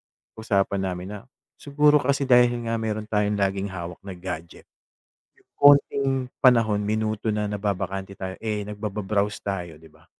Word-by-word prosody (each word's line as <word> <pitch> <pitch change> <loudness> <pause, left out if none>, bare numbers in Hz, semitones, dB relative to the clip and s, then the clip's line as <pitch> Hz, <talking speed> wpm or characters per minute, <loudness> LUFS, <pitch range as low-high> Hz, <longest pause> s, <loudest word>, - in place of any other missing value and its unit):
napag-usapan 100 -3 -2
namin 90 -1 -4
na - - -7 0.4
siguro 150 +1 +4
kasi 140 0 0
dahil 125 -1 +6 0.2
nga 115 - -1
meron 110 -1 -3
tayong 105 -1 0
laging 100 0 0
hawak 90 -2 -7
na 95 -1 -7
gadget. 85 -2 -7 0.7
Yung - - -30
konting 140 -1 +5 0.3
panahon, 115 -5 +4
minuto 110 +1 -1
na 105 0 -1
nababakante 100 -1 -3
tayo, 95 0 -5
eh, 105 -2 -2
nagbaba-browse 105 -1 -2
tayo, 90 -5 -4
'di 80 - -15
ba? - - -23
105 Hz, 145 wpm, -24 LUFS, 95-110 Hz, 0.7 s, dahil